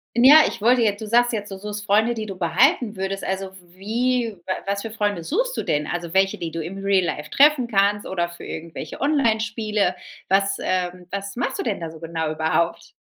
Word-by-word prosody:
Ja, 265 +6 +8
ich - - -4
wollte 245 +3 +4
jetzt 205 -3 +1
du 220 - -5
sagst 240 +2 +3
jetzt, 205 -3 -4
du 195 - -6
suchst 210 +1 -6
Freunde, 220 +3 +3
die 220 -2 -4
du 195 -2 -6
behalten 220 - +2
würdest. 195 +1 -3
Also 190 0 -3
w 180 -2 -17
wie 235 +1 0
wa 185 - -1
was 200 0 -1
für 225 - -6
Freunde 205 -5 -1
suchst - - -1
du - - -2
denn? 150 0 -1
Also 170 -1 -4
welche, 190 0 +2
die 165 -1 -5
du 165 - -4
im 175 +5 -6
Real 195 -2 +3
Life 150 -2 -4
treffen 285 -3 +4
kannst 205 -1 +2
oder 175 -2 -1
für 170 0 -12
irgendwelche 165 0 -7
Onlinespiele? 220 -8 +1 0.3
Was, 195 +1 +2
ähm, 180 -1 -2
was 200 +2 -5
machst 245 - -2
du - - -1
denn 215 -5 -2
da 165 -1 -5
so 160 - -12
genau 165 -1 -3
überhaupt? 160 +2 -1
200 Hz, 215 wpm, -22 LUFS, 180-225 Hz, 0.3 s, Ja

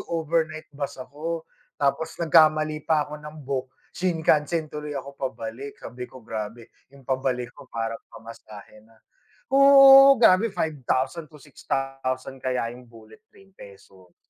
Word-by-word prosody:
overnight 160 -1 -1
bus 140 0 -5
ako 160 +5 -6 0.3
tapos 145 +2 -1
nagkamali 155 -2 +3
pa 155 -2 +2
ako 150 +1 -9
ng 150 +1 -10
book, 130 -1 -3 0.3
Shinkansen 160 -3 0
tuloy 150 -1 -6
ako 140 +1 -7
pabalik. 125 +2 -6
Sabi 125 0 -9
ko 130 -3 -15
grabe 115 +1 -7 0.2
yung 135 0 -19
pabalik 130 -2 -2
ko - - -16
parang 115 0 -4
pamasahe 110 -2 -13
na. 110 +1 -24 0.6
Oo, 275 0 +8
grabe 225 -2 +5
5,000 155 -1 -2
to 150 - -16
6,000 135 -2 -5
kaya 125 -3 -2
yung 125 0 -14
bullet 115 - -17
train, 195 0 -22
peso. 95 - -17
140 Hz, 135 wpm, -24 LUFS, 125-160 Hz, 0.6 s, Oo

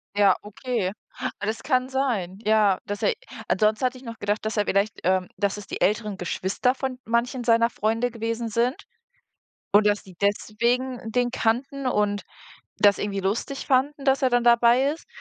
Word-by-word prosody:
Ja, 200 -2 +5
okay, 210 -1 -3 0.5
das 220 +2 -2
kann 255 -2 +1
sein. 220 -9 -1
Ja. 210 -3 +3
Dass 205 0 -5
er - - +3 0.3
ansonsten 215 +3 +2
hatte 255 0 -1
ich 255 - -14
noch 230 -1 -8
gedacht, 205 +1 -1
dass 220 0 -2
er 205 - +2
vielleicht, 200 +2 0
ähm 185 0 +2
dass 200 +1 0
es 205 - -9
die - - -6
älteren 210 -1 +1
Geschwister 190 +7 0
von 265 -1 -4
manchen 240 +2 0
seiner 230 0 +4
Freunde 230 +2 -1
gewesen 230 0 -3
sind, 235 +4 +1 1.0
und, 205 +1 +6
dass 205 0 +2
die 185 -2 -15
deswegen 235 +5 0
den 245 +1 +1
kannten, 260 +4 -1
und 205 -3 0 0.5
das 205 -1 +4
irgendwie 200 -1 -2
lustig 215 +8 -2
fanden, 275 +1 +1
dass 270 0 +2
er 260 - +5
dann 245 0 +3
dabei 240 +3 +5
ist. 325 - -11
230 Hz, 175 wpm, -25 LUFS, 205-250 Hz, 1.0 s, und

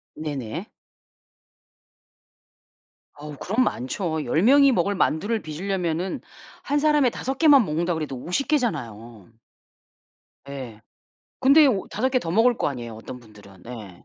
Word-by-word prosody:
네네. 140 -8 -5 2.5
어 150 0 -9
그럼 220 - 0
많죠. 160 - -2
10 160 - +1
명이 275 +5 +6
먹을 200 -2 0
만두를 205 +6 0
빚으려면은 175 +2 -3 0.4
한 290 +1 0
사람에 295 -3 +3
5 265 +3 -5
개만 285 -6 +6
먹는다고 165 +1 -1
해도 145 -3 -4
50 180 - -2
개잖아요. 120 - -3 1.2
예. 125 -6 -8 0.6
근데 290 +3 +6
오 210 -8 0
5 240 +6 -1
개 260 -1 +1
더 165 - -5
먹을 225 +6 +3
거 - - 0
아니에요, 120 -5 -7
어떤 115 +3 -9
분들은. 105 -5 -17
네. 110 -7 -10
165 Hz, 230 characters per minute, -24 LUFS, -, 2.5 s, 명이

